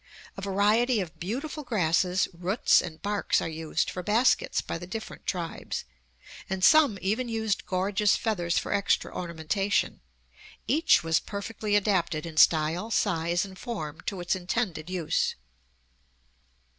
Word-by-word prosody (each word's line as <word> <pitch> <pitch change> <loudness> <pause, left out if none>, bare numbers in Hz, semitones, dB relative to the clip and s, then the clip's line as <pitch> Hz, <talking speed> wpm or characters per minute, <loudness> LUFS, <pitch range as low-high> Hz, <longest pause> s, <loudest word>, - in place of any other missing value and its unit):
A 195 - -7
variety 210 +5 +2
of 170 -4 -5
beautiful 270 - -4
grasses, 180 - +1
roots, 180 +6 +3
and 155 -1 -8
barks 205 0 +1
are - - -3
used 160 0 -2
for 180 - -5
baskets 220 +6 +2
by - - -4
the 175 - -8
different 220 +4 -7
tribes, 170 -3 -4 0.6
and 190 -1 -3
some 300 -8 +6
even 225 +6 0
used 220 -3 -1
gorgeous 195 +2 +2
feathers 175 -7 -1
for - - -1
extra 200 -1 0
ornamentation. 175 +4 -1 0.7
Each 320 - +4
was 165 0 +2
perfectly 205 +1 -3
adapted 185 -6 +1
in 160 -2 -8
style, 160 +7 +4
size, 175 -4 +1
and 190 -1 -12
form 160 - -5
to 195 - -2
its 175 - 0
intended 180 -3 -2
use. 180 -4 0
190 Hz, 135 wpm, -27 LUFS, 170-215 Hz, 0.7 s, some